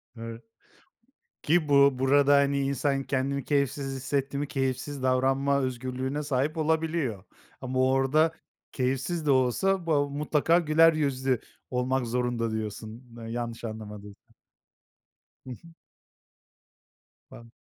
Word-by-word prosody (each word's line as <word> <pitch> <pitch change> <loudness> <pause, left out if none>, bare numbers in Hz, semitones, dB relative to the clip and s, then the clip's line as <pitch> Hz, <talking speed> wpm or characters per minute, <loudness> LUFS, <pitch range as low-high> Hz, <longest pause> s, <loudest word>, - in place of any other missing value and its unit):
Doğru. 115 0 -8 1.0
Ki 160 -1 +2
bu 140 -2 +5
burada, 140 +1 +4
hani, 140 0 +3
insan 140 0 0
kendini 135 +1 -1
keyifsiz 140 -1 -1
hissetti 135 +1 -2
mi 145 0 -2
keyifsiz 135 +1 -3
davranma 135 +2 +2
özgürlüğüne 130 +3 -3
sahip 145 +3 -1
olabiliyor 160 - -1 0.4
ama 130 0 -2
orada 135 +5 +3 0.4
keyifsiz 135 +5 -2
de 145 - +3
olsa, 165 +9 +2
ba 145 -3 +2
mutlaka 150 +3 +2
güler 165 0 +5
yüzlü 135 -4 0 0.3
olmak 125 0 -1
zorunda, 120 -1 -1
diyorsun 110 +2 -5 0.2
yanlış 115 0 -5
anlamadıysam. 105 -2 -9 1.2
Hı - - -6
hı. 165 +7 -12 1.6
Bam 115 0 -13
135 Hz, 110 wpm, -27 LUFS, 125-145 Hz, 1.6 s, bu